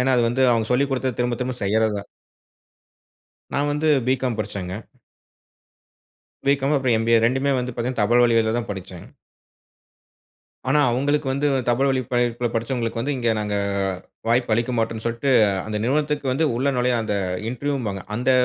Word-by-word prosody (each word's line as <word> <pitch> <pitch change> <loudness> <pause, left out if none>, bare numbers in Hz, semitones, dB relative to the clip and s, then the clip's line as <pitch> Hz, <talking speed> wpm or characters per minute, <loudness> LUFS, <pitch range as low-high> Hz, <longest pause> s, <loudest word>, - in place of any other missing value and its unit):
ஏனா, 130 +1 +2
அது 120 - +3
வந்து 125 +3 0
அவுங்க 115 -2 +1
சொல்லி 135 +3 +3
கொடுத்தத, 130 -2 -1
திரும்ப, 120 -1 0
திரும்ப 125 0 -2
செய்றது 110 +2 +2
தான். 100 - -9 1.5
நான் 145 +1 +1
வந்து 155 +2 0 0.2
பி-காம் 130 -2 0
படிச்சேங்க. 95 -3 -4 1.7
பி.காம். 140 +1 +2
அப்புறம் 130 -3 +2
எம்.பி.ஏ. 115 +1 +3
2மே 130 +3 +1
வந்து 125 0 -3
பாத்தீங்கன்னா, 120 0 -2
தபால் 120 +4 +4
வழியால 115 -2 +3
தான் 120 - -5
படிச்சேன். 95 -3 -8 1.6
ஆனா, 145 +3 +4
அவுங்களுக்கு 145 +4 0
வந்து 145 +2 +1 0.2
தபால் 130 +3 +2
வழிப் 130 -3 -1
பயி 120 0 +3
ப்ப 120 -1 0
படிச்சவங்களுக்கு 115 0 -2
வந்து, 140 +4 -1
இங்க 120 -2 0
நாங்க 105 -1 -2 0.7
வாய்ப்பு 120 0 +2
அளிக்க 120 +2 -1
மாட்டோம்ன்னு 115 0 -2
சொல்ட்டு, 115 +4 -1 0.4
அந்த 110 0 -3
நிறுவனத்துக்கு 145 +1 0
வந்து 155 +5 +1
உள்ளே 140 +3 +1
நுழைய 125 0 +2
அந்த 105 -2 -2 0.4
இன்டர்வியூம்பாங்க 125 -7 -3
அந்த 125 +3 +1
125 Hz, 155 wpm, -22 LUFS, 115-135 Hz, 1.7 s, தபால்